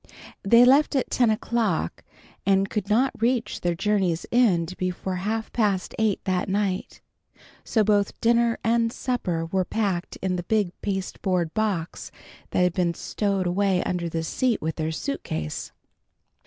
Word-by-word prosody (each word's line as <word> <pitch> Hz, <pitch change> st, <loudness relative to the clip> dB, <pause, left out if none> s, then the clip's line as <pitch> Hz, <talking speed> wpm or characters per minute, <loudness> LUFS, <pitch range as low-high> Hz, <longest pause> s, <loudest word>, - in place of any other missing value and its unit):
They 235 Hz, +5 st, +6 dB
left 280 Hz, +4 st, +4 dB
at 265 Hz, -, 0 dB
ten 245 Hz, -3 st, +3 dB
o'clock, 215 Hz, -, -1 dB, 0.4 s
and 195 Hz, 0 st, +2 dB
could 210 Hz, -2 st, -2 dB
not 255 Hz, +5 st, +3 dB
reach 235 Hz, -2 st, 0 dB
their 175 Hz, -1 st, 0 dB
journey's 190 Hz, -3 st, 0 dB
end 185 Hz, -8 st, +2 dB
before 185 Hz, 0 st, -3 dB
half 220 Hz, +4 st, -3 dB
past 205 Hz, -5 st, 0 dB
eight 220 Hz, -3 st, +2 dB
that 185 Hz, 0 st, 0 dB
night. 195 Hz, -1 st, -2 dB, 0.6 s
So 220 Hz, -, +2 dB
both 205 Hz, -1 st, +1 dB
dinner 235 Hz, 0 st, +3 dB
and 230 Hz, 0 st, +2 dB
supper 185 Hz, -11 st, -2 dB
were 185 Hz, +3 st, 0 dB
packed 190 Hz, -2 st, -2 dB
in 185 Hz, -1 st, -2 dB
the 175 Hz, -, -4 dB
big 210 Hz, -5 st, +2 dB
pasteboard 185 Hz, -3 st, -2 dB
box 200 Hz, -6 st, -2 dB, 0.4 s
which 180 Hz, -, +2 dB
had 180 Hz, -1 st, +2 dB
been 170 Hz, -2 st, 0 dB
stowed 200 Hz, -3 st, -1 dB
away 185 Hz, +1 st, +1 dB
under 175 Hz, -2 st, -2 dB
the 165 Hz, 0 st, -2 dB
seat 240 Hz, +8 st, 0 dB
with 160 Hz, 0 st, -3 dB
their 160 Hz, 0 st, -1 dB
suitcase. 80 Hz, -, -4 dB
195 Hz, 150 wpm, -25 LUFS, 180-225 Hz, 0.6 s, They